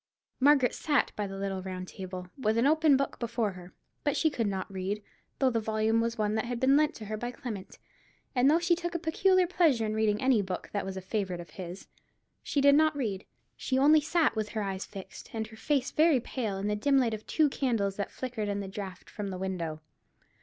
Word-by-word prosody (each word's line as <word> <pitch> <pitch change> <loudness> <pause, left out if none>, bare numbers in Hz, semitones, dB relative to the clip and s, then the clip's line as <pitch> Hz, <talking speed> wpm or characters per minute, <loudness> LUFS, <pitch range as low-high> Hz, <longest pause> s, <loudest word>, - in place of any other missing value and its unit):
Margaret 275 -2 +5
sat 290 -4 +1
by 205 -1 -2
the 195 0 -7
little 195 -1 -3
round 185 -1 -6
table, 185 -1 -7
with 220 -5 0
an 235 - +3
open 310 -1 +5
book 275 0 -2
before 230 -3 -1
her. 180 -1 -11 0.3
But 290 - +1
she 315 - +3
could 230 -6 -1
not 195 0 -3
read, 195 +3 -3 0.3
though 265 -2 +3
the 230 - +1
volume 220 +1 +1
was 230 0 -1
one 210 -1 0
that 220 +2 0
had 240 0 -3
been 265 +2 +4
lent 300 0 +2
her 215 -1 -5
by 240 +3 -3
Clement, 240 -7 -7 0.6
and 255 +1 +4
though 310 - +5
she 345 +1 +2
took 345 0 -4
a - - +3
peculiar 365 +3 +3
pleasure 325 -10 +2
in 215 - -1
reading 215 -1 +1
any 255 -5 +3
book 185 -2 -5
that 205 -1 -2
was 190 0 -5
a - - -4
favourite 190 -2 -2
of 170 - -10
his. 185 -1 -8 0.5
She 285 - 0
did 280 0 +7
not 310 0 +4
read; 205 -8 -2 0.3
she 260 - -1
only 300 +3 +6
sat 315 -4 +2
with 215 -1 -2
her 215 -1 -2
eyes 195 -1 -3
fixed, 195 -2 -10
and 220 0 -1
her 220 0 -13
face 270 +4 0
very 310 -3 +4
pale, 225 -4 -3
in 195 - -3
the 210 0 +1
dim 275 +6 +2
light 240 -4 +2
of 215 0 -6
two 310 -2 +3
candles 230 -8 0
that 200 - -2
flickered 240 -5 -4
in 200 0 -1
the 200 - -4
draught 190 -2 -7
from 210 -2 -5
the 185 -1 -4
window. 170 -5 -3
220 Hz, 230 wpm, -29 LUFS, 195-275 Hz, 0.6 s, did